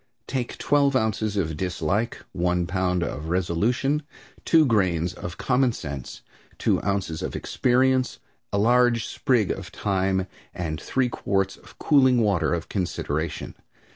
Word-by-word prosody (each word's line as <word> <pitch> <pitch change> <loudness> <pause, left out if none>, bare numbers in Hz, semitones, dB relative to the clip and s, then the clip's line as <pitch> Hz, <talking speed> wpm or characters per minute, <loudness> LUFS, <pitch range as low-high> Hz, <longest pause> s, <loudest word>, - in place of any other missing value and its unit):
Take 125 -3 -3
twelve 140 -1 +2
ounces 110 -3 0
of 80 -5 -1
dislike, 95 +6 -2
one 90 0 0
pound 90 -1 0
of 75 -1 -4
resolution, 105 - +1 0.4
two 160 -2 +5
grains 90 - +1
of 85 -1 -7
common 130 -1 +2
sense, 70 - -7 0.3
two - - +1
ounces 100 -5 -2
of - - -4
experience, 130 +1 +1 0.3
a - - 0
large 120 +1 +3
sprig 120 -7 +1
of - - -6
time, 95 -1 0 0.3
and 80 -3 -3
three 130 -1 0
quarts 95 -4 -1
of - - -18
cooling 130 -4 +4
water 100 -8 +2
of 85 -1 -2
consideration. 85 -4 -3
100 Hz, 135 wpm, -25 LUFS, 90-125 Hz, 0.4 s, two